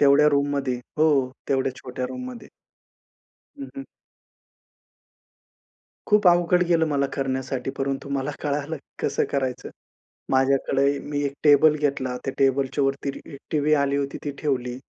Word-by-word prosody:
तेवढ्या 145 +1 +6
रूममध्ये. 140 -3 0 0.2
हो, 155 +1 +5 0.4
तेवढ्या 135 -1 +1
छोट्या 125 -1 -4
रूममध्ये. 255 -1 -7 1.1
हं, 275 - -6
हं. 275 - -5 2.2
खूप 210 -2 +3
अवघड 175 +1 +4
गेलं 165 -2 +3
मला 140 -1 +1
करण्यासाठी, 130 -1 -2
परंतु 135 0 -2
मला 140 +1 -2
कळालं 145 +2 -2 0.3
कसं - - +1
करायचं. 130 -3 -2 0.6
माझ्याकडे 135 +1 +2
ए - - -4
मी 145 0 -1
एक 140 - -1
टेबल 150 +1 +6
घेतला. 135 -4 -1
त्या 135 - -2
टेबलच्यावरती 135 +1 +1
रि 140 - -10
टीव्ही 150 0 +2
आली 140 -1 +1
होती 140 -1 -2
ती 145 - -1
ठेवली. 125 -4 -1
140 Hz, 130 wpm, -24 LUFS, 135-150 Hz, 2.2 s, तेवढ्या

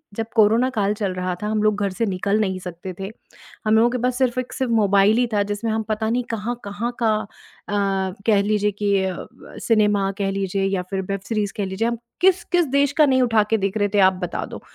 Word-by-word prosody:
जब 225 - -2
कोरोना 225 +3 +4
काल 200 0 +2
चल 205 -3 -2
रहा 185 0 -2
था, - - -1
हम 215 0 0
लोग 215 -1 +2
घर 200 - +1
से 230 +5 -1
निकल 200 +1 0
नहीं 190 -3 -1
सकते 180 +1 -7
थे। 195 +2 -5 0.6
हम 215 - +4
लोगों 230 +2 +4
के 250 - -2
पास 250 0 0
सिर्फ़ 255 -2 +1
एक 255 - -8
सिर्फ़ 260 -3 -2
मोबाइल 205 -1 +4
ही 245 - +3
था, 205 -1 +2
जिसमें 205 +2 -3
हम 220 0 0
पता 220 0 -1
नहीं 245 +2 +1
कहाँ-कहाँ 225 0 -4
का 220 -2 +3 0.5
अ, 195 -2 0
कह 210 -3 +4
लीजिए 210 0 +1
कि 205 0 -1
अ, 190 - -1 0.2
ब - - -15
सिनेमा 210 -3 +3
कह 195 -1 0
लीजिए 195 0 -1
या 195 -1 0
फिर 195 -1 -1
वेब 195 0 -2
सीरीज़ 210 -3 -1
कह 205 - -1
लीजिए। 190 +5 -1
हम 235 0 -2 0.2
किस-किस 355 -1 +3
देश 280 +1 +2
का 305 - +4
नहीं 260 -2 +3
उठा 225 -3 +3
के 225 - +4
देख 195 +1 -2
रहे 205 -1 +2
थे, 205 +1 -1
आप 190 -1 +6
बता 180 - -3
दो। - - -9
210 Hz, 235 wpm, -22 LUFS, 195-230 Hz, 0.6 s, आप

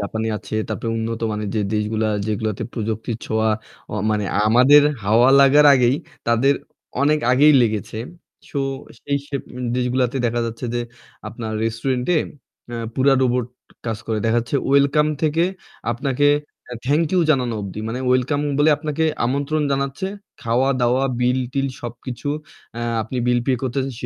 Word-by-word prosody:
জাপানে 110 +2 -3
আছে 100 0 -8
তারপরে 115 +1 -3
উন্নত 115 0 -3
মানে 105 0 -3
যে 110 - +1
দেশগুলা 110 +1 0 0.2
যেগুলোতে 110 -1 -2
প্রযুক্তির 110 0 -3
ছোঁয়া 110 0 +1 0.4
ও - - -3 0.2
মানে 105 -1 0 0.2
আমাদের 130 +6 +6 0.2
হাওয়া 115 +5 +5
লাগার 145 +2 +6
আগেই 125 +1 +3 0.3
তাদের 125 +5 +3 0.5
অনেক 150 +2 +3
আগেই 145 +4 +6
লেগেছে। 110 -1 -2 0.5
সো 140 - -3 0.4
সেই 140 0 -1
সব 140 -2 -3 0.4
দেশগুলাতে 125 +1 0
দেখা 120 +1 -1
যাচ্ছে 115 +2 -6
যে 120 - 0 0.5
আপনার 110 -1 -6
রেস্টুরেন্ট 125 +3 -1
অ্যা 135 -6 -5 0.2
পুরো 135 +1 +4
রোবট 125 -1 +1 0.4
কাজ 110 -2 -2
করে। 110 -1 -1
দেখা 115 +1 +2
যাচ্ছে 120 +4 -2
ওয়েলকাম 140 +2 +4 0.2
থেকে 160 +2 +2 0.5
আপনাকে 135 +3 0 0.6
থ্যাংক 150 +4 +2
ইউ 180 - +4
জানানো 125 -5 +1
অবধি। 100 +1 -6
মানে 125 +3 -3
ওয়েলকাম 130 +3 +2 0.2
বলে 150 +1 +5
আপনাকে 155 +1 -2 0.2
আমন্ত্রণ 140 +4 0
জানাচ্ছে। 140 +6 -2 0.4
খাওয়া-দাওয়া, 125 +1 +1 0.2
বিল-টিল 130 +2 0 0.2
সবকিছু 120 +2 -6 0.7
আপনি 120 +4 -6
আ - - -2
বিল 125 0 +3
পে 135 - +3
করতেছেন, 130 +1 -2
125 Hz, 140 wpm, -21 LUFS, 115-140 Hz, 0.7 s, আমাদের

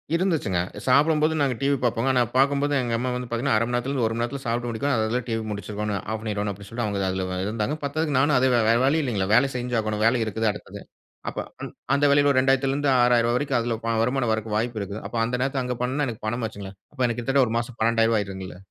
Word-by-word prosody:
இருந்துச்சுங்க. 165 - 0 0.3
சாப்புடும்போது 150 +4 +3
நாங்க 135 -4 +1
டிவி 140 0 +2
பாப்போங்க. 120 +2 +1
ஆனா, 125 - +3
பாக்கும்போது 140 +2 +2
எங்க 120 -2 -2
அம்மா 125 +2 -2
வந்து 125 0 -4
பாத்தீங்கன்னா, 120 0 0
"1/2 110 - +2
மணி 120 - -4
நேரத்துல 120 +3 -1
இருந்து 130 -5 0
1 110 - -3
மணி 115 - -2
நேரத்துல 135 +3 -4
சாப்பிட்டு 120 0 -2
முடிக்கணும். 125 +4 -1
அதுல 110 +3 0
டிவி 115 -1 -1
முடிச்சிருக்கோணும். 105 0 -3
ஆஃப் 110 0 -2
பண்ணிறோணும்" 105 -2 -2
அப்டீன்னு 100 +1 -12
சொல்லிட்டு, 120 0 -3
அவங்க 100 -1 -2
அதுல 95 0 -2 0.2
இருந்தாங்க. 110 +6 -2
பத்தாதுக்கு 145 0 -1
நானும் 140 0 +3
அதே 130 +1 +3
வே 120 - +4
வேற 115 - +5
வழி 155 +4 +3
இல்லைங்கள. 105 -8 -1
வேல 135 +4 +5
செஞ்சாகணும். 115 -4 -1
வேல 120 +1 +3
இருக்குது 110 0 0
அடுத்தது. 105 - -10 0.5
அப்ப - - -11 0.6
அந்த 145 +1 +3
வேலைல 145 0 +4
2000ல 135 +1 +2
இருந்து 145 0 0
ரூ.6,000 120 -1 +3
வரைக்கும் 140 -2 0
அதுல 115 0 -1
வ 115 - +1
வருமானம் 125 0 +1
வரக்கு 110 -1 -3
வாய்ப்பு 115 0 -1
இருக்கு. 100 +1 -5
அப்ப 115 - -9
அந்த 120 +2 -2
நேரத்துல 135 0 0
அங்க 125 0 -2
பண்ணுனா 135 +4 0
எனக்கு 110 -2 -6
பணம் 120 +2 -2
ஆச்சுங்களே. 100 -2 -9 0.2
அப்ப 135 - -20
எனக்கு 120 0 -1
கிட்டத்தட்ட 135 +2 +3
ஒரு 115 - -2
மாசம் 120 0 -6
₹12,000 115 0 +3
ஆயிருந்துங்கல. 95 -2 -6
120 Hz, 225 wpm, -24 LUFS, 110-135 Hz, 0.6 s, வேற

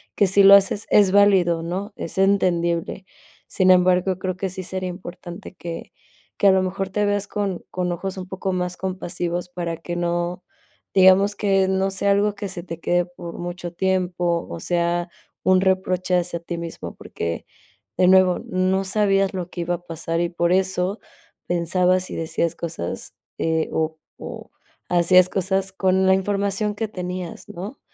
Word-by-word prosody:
que 200 - +3
si 200 +1 +5
lo 200 +1 +10
haces 200 +1 +2
es 200 -3 +5
válido, 190 -5 +4
¿no?, 190 +5 -4
es 165 - -6
entendible. 180 -2 +1 0.4
Sin 185 -1 +2
embargo, 185 0 +3
creo 185 -1 -2
que 190 0 -2
sí 185 +1 -6
sería 185 0 -4
importante 180 +1 -9
que 170 -1 -7 0.5
que 200 - +4
a - - +8
lo 190 0 +3
mejor 190 +1 -3
te 205 +2 0
veas 205 0 0
con 200 -4 -3
con 180 -1 -2
ojos 190 +2 -4
un 185 - -6
poco 190 0 -3
más 180 0 -2
compasivos 180 -1 -3
para 170 -2 -4
que 175 +1 -6
no, 175 +1 -2 0.5
digamos 190 +2 +6
que 195 -2 +2
no 190 0 +1
sea 195 +1 0
algo 205 +1 +2
que 200 0 -5
se 180 -2 -5
te 170 -2 -7
quede 175 +1 +1
por 175 -1 -9
mucho 175 0 -5
tiempo, 180 -2 0
o 85 - -6
sea, 175 - 0 0.3
un 185 0 +4
reproche 185 -1 +1
hacia 175 -1 -2
ti 170 +1 -6
mismo, 170 -1 -7
porque 85 0 -5 0.5
de 180 - +4
nuevo, 185 -1 +5
no 185 +1 +1
sabías 195 -1 +2
lo 180 -1 -4
que 175 - -5
iba 175 +1 -1
a 175 - -11
pasar 165 0 -3
y 175 - 0
por 170 0 0
eso, 190 +1 0 0.5
pensabas 180 +2 +1
y - - -6
decías 165 +1 -1
cosas 165 - -5 0.3
eh, 160 -1 0
o 160 0 -1 0.2
o - - -9 0.4
hacías 180 +1 +5
cosas 190 0 0
con 190 0 +2
la 190 - +6
información 200 +2 0
que 225 +1 -2
tenías, 180 -2 -6
¿no?, 200 +10 -7
185 Hz, 170 wpm, -22 LUFS, 175-190 Hz, 0.5 s, lo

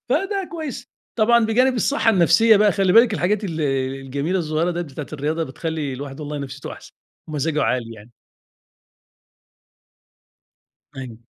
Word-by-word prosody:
فده 390 +8 -1
كويس، 315 -6 -6 0.3
طبعًا 235 +1 +4
بجانب 250 +4 +3
الصحة 240 0 +2
النفسية 200 +3 +5
بقى 210 0 +4
خلي 195 -2 +2
بالِك، 225 -1 +6
الحاجات 205 +3 0
ال 165 -4 -4 0.4
الجميلة 140 +7 -2
الصغيّرة 160 +1 0
ديّة 175 - -3
بتاعة 145 -2 -7
الرياضة 155 +3 -2
بتخلّي 155 0 -4
الواحد 135 +2 -7
والله 150 0 -5
نفسيته 140 0 -7
أحسن، - - -13 0.4
ومزاجه 150 0 -1
عالي 115 -1 -1
يعني. 110 +2 -15 2.9
أيوه. 125 -4 -8
165 Hz, 130 wpm, -21 LUFS, 140-220 Hz, 2.9 s, بالِك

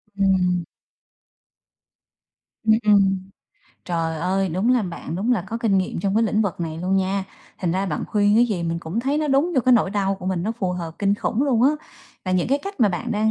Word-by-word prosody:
Ừm. 185 -3 +2 2.0
Ừm, 220 -1 +4
ừm. 195 -2 +3 0.6
Trời 165 -2 -2
ơi! 190 +3 0
Đúng 190 +9 +1
là 245 - +2
bạn 175 -3 -6
đúng 220 +7 +1
là 225 - 0
có 230 - -3
kinh 210 -5 +2
nghiệm 185 -2 -2
trong 195 +1 0
cái 225 - +4
lĩnh 215 -1 +2
vực 185 -4 -3
này 160 -1 -4
luôn 185 +3 0
nha, 190 0 0 0.3
thành 175 -3 -1
ra 195 +2 0
bạn 150 - -2
khuyên 205 0 +2
cái 240 +1 +5
gì 190 -6 -2
mình 165 0 -2
cũng 170 +7 -3
thấy 275 +4 0
nó 305 -1 -1
đúng 285 +6 +2
vô 260 - +4
cái 255 - +5
nỗi 220 -5 +3
đau 195 -1 0
của 190 -1 -9
mình, 185 -2 -1
nó 215 +4 -1
phù 185 -2 -1
hợp 170 -2 -5
kinh 200 0 +2
khủng 220 +4 -1
luôn 250 -5 +2
á. 275 - +6 0.5
Và 185 - -2
những 185 +4 +1
cái 280 +2 +2
cách 395 -1 -8
mà 215 - +5
bạn 215 +6 -3
đang 215 +1 +1
195 Hz, 230 wpm, -22 LUFS, 180-225 Hz, 2.0 s, á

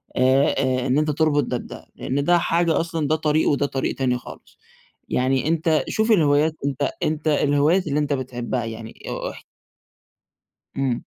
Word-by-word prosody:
آآ، 130 +2 +3 0.3
آآ، 135 - -2
إن 130 - +2
أنت 155 0 +1
تربط 150 -1 +2
ده 125 - -2
بده، - - -10
لإن 140 +2 -2
ده 175 +3 +4
حاجة 170 -1 +1
أصلًا 165 -3 -2
ده 155 - +2
طريق 155 0 +1
وده 145 -1 +1
طريق 135 -1 -2
تاني 125 -2 0
خالص. - - -13 0.5
يعني 130 +2 +1
أنت 160 -1 +1
شوف 220 +1 +1
الهوايات، 155 -4 +3
أنت 140 -2 -1
أنت 155 0 -1
الهوايات 150 +4 +2
اللي 145 +1 0
أنت 145 -1 0
بتحبها 125 -2 -3
يعني 115 0 -7 0.2
أو - - -4
اح - - -12 1.3
إمم. 135 -3 -1
145 Hz, 165 wpm, -22 LUFS, 130-155 Hz, 1.3 s, ده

